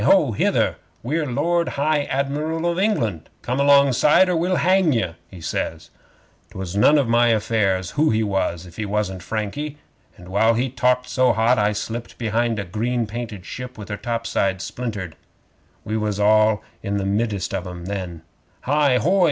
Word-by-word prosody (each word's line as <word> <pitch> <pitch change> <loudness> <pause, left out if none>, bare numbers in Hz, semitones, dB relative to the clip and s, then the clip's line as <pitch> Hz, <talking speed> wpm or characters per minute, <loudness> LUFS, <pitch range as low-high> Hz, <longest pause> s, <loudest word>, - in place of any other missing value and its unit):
Ho! - - +4
Hither! - - +1 0.3
We're 150 +5 -1
Lord 170 +6 +1
High 145 0 +1
Admiral 150 +5 -2
of 175 +1 0
England! 115 - 0
Come 125 +2 -2
alongside, 140 +5 +5
or 180 - +1
we'll 175 +3 +1
hang 185 -4 +3
ye," 110 -8 -1 0.2
he 90 -3 -12
says. 80 0 -4 0.6
''Twas 95 -1 -6
none 105 +9 +5
of 140 -4 +2
my 120 +1 +4
affairs 105 -5 +1
who 155 +1 +2
he 110 0 +1
was 95 -4 -1
if 85 -2 -14
he 110 - -2
wasn't 100 -3 -2
Frankie, 110 - -4 0.4
and 90 0 -13
while 110 +4 +3
he 125 +2 -1
talked 125 0 +1
so 125 -1 +2
hot 115 +2 +3
I 105 0 +2
slipped 115 +3 -5
behind 115 0 0
a 100 - -2
green 115 +6 -1
painted 110 -3 -6
ship 125 0 -7
with 105 -1 -9
her 105 - -2
top 115 0 -3
sides 95 -4 0
splintered. 105 -10 -5 0.7
We 110 +1 -2
was 105 -2 -2
all 110 0 +4 0.2
in 100 0 -2
the 100 - -2
middest 100 -1 -1
of 95 -1 -3
'em 90 -1 -8
then. 90 -4 -5 0.4
'"Hi! 145 -1 +3
Hoi!" 185 +8 +2
115 Hz, 175 wpm, -22 LUFS, 100-140 Hz, 0.7 s, alongside